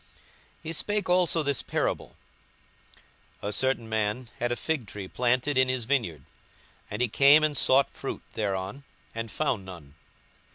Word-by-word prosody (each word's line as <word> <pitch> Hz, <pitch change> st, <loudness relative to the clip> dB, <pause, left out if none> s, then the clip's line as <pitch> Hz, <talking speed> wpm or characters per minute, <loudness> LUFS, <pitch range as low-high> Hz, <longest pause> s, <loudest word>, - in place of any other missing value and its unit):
42:013:006 -, -, -29 dB, 0.5 s
He 165 Hz, 0 st, -4 dB
spake 205 Hz, +4 st, -2 dB
also 175 Hz, -3 st, +3 dB
this 140 Hz, -2 st, 0 dB
parable; -, -, -2 dB, 1.3 s
A 105 Hz, -, -1 dB
certain 130 Hz, 0 st, 0 dB
man 110 Hz, +2 st, -1 dB
had 120 Hz, 0 st, 0 dB
a -, -, +1 dB
fig 125 Hz, +1 st, -2 dB
tree 100 Hz, 0 st, -7 dB
planted 125 Hz, +5 st, +1 dB
in 130 Hz, 0 st, +4 dB
his 130 Hz, -3 st, -1 dB
vineyard; 110 Hz, -, 0 dB, 0.7 s
and 105 Hz, +4 st, -1 dB
he -, -, +2 dB
came 140 Hz, +6 st, +6 dB
and 155 Hz, -1 st, +2 dB
sought 135 Hz, 0 st, +4 dB
fruit -, -, -6 dB
thereon, 100 Hz, +5 st, -3 dB, 0.3 s
and 115 Hz, 0 st, -4 dB
found 120 Hz, -6 st, -1 dB
none. 85 Hz, -7 st, -11 dB
125 Hz, 155 wpm, -27 LUFS, 105-140 Hz, 1.3 s, came